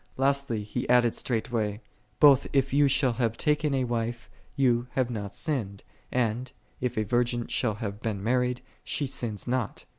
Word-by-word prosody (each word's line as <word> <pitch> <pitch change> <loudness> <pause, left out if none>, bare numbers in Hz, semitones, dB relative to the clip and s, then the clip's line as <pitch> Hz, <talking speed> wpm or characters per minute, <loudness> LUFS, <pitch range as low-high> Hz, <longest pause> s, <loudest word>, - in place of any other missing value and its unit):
Lastly, 135 -5 +1
he 115 +4 -4
added 120 -2 +5
straightway, 110 -3 -1 0.2
" - - -39
Both 140 -4 +6
if 135 -1 +2
thou 140 +1 +4
shall 135 -2 +2
have 115 -1 -1
taken 150 -1 +1
a 130 - +1
wife, 120 -1 -3 0.3
thou 125 -3 +2
hast 130 -2 +1
not 100 -3 -4
sinned; 110 - -3 0.3
and, 125 +1 0 0.3
if 125 -2 -2
a 110 - +2
virgin 120 +2 0
shall 110 -4 0
have 105 -2 -5
been 110 -4 -3
mar 125 +4 +2
ried, 125 0 -1 0.2
she 145 - -1
sinneth 120 -5 -3
not." 125 -3 -2
120 Hz, 175 wpm, -27 LUFS, 115-130 Hz, 0.3 s, Both